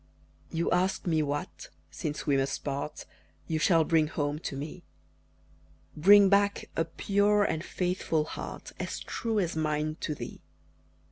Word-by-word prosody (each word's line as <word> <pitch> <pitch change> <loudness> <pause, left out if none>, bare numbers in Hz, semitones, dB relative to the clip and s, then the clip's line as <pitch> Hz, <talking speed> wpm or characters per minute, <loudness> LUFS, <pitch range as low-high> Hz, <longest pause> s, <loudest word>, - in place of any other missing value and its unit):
You 165 +1 -1
ask 185 +2 +1
me 160 -3 +2
what 145 0 -4 0.2
since 150 0 -4
we 145 - +3
must 135 0 -1
part 140 +1 -4 0.4
You 160 -1 -1
shall 165 0 +4
bring 160 -1 +3
home 145 -1 -2
to 140 - -5
me; 145 +3 -7 1.1
Bring 200 +5 +7
back 200 +1 +2
a 165 - +1
pure 205 +4 +2
and 160 -5 -1
faithful 180 -4 -1
heart, 155 - -7
As - - -3
true 225 -2 -3
as 175 -5 -1
mine 155 0 -1
to 150 - -2
thee. - - -8
160 Hz, 145 wpm, -29 LUFS, 150-185 Hz, 1.1 s, Bring